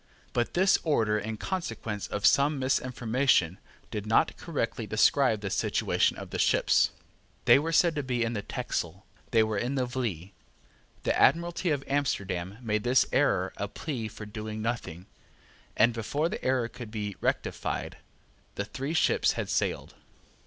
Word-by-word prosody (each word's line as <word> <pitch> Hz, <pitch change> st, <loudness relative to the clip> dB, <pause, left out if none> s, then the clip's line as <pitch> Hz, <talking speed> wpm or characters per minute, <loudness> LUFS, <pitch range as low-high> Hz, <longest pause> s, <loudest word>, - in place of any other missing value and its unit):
But 120 Hz, -1 st, -1 dB
this 190 Hz, +2 st, +4 dB
order, 110 Hz, -9 st, +2 dB
in 110 Hz, +1 st, -5 dB
consequence 115 Hz, -, -4 dB
of 105 Hz, -, -3 dB
some 145 Hz, +1 st, +4 dB
misinformation, 125 Hz, -7 st, +1 dB, 0.3 s
did 105 Hz, 0 st, -4 dB
not 115 Hz, +9 st, +3 dB
correctly 115 Hz, -8 st, -3 dB
describe 110 Hz, +2 st, +3 dB
the 100 Hz, -2 st, -4 dB
situation -, -, +1 dB
of -, -, -8 dB
the -, -, -3 dB
ships. -, -, +3 dB, 0.6 s
They -, -, +7 dB
were 160 Hz, +3 st, -2 dB
said 165 Hz, +1 st, +4 dB
to 145 Hz, -, -2 dB
be 125 Hz, -3 st, -1 dB
in 115 Hz, +1 st, -1 dB
the 105 Hz, -, -2 dB
Texel. 90 Hz, -1 st, -4 dB, 0.2 s
They 115 Hz, -2 st, +4 dB
were 110 Hz, -2 st, -1 dB
in 125 Hz, +5 st, -2 dB
the 130 Hz, -2 st, +1 dB
Vlie. 110 Hz, -8 st, -4 dB, 0.7 s
The -, -, +1 dB
Admiralty 170 Hz, +1 st, +2 dB
of 145 Hz, -3 st, 0 dB
Amsterdam 100 Hz, -9 st, -1 dB
made 105 Hz, -2 st, 0 dB
this 125 Hz, +1 st, +4 dB
error -, -, +2 dB
a -, -, -2 dB
plea 125 Hz, -8 st, -4 dB
for 105 Hz, 0 st, -9 dB
doing 110 Hz, +1 st, -6 dB
nothing; 110 Hz, -7 st, -4 dB, 0.7 s
and, 115 Hz, +2 st, +5 dB
before 145 Hz, +8 st, -1 dB
the -, -, -6 dB
error 130 Hz, -2 st, +1 dB
could 120 Hz, -1 st, -9 dB
be 105 Hz, -2 st, -4 dB
rectified, -, -, -2 dB, 0.6 s
the 100 Hz, -, -2 dB
three 135 Hz, +8 st, -4 dB
ships -, -, +3 dB
had -, -, -3 dB
sailed. -, -, -1 dB
115 Hz, 160 wpm, -28 LUFS, 105-140 Hz, 0.7 s, They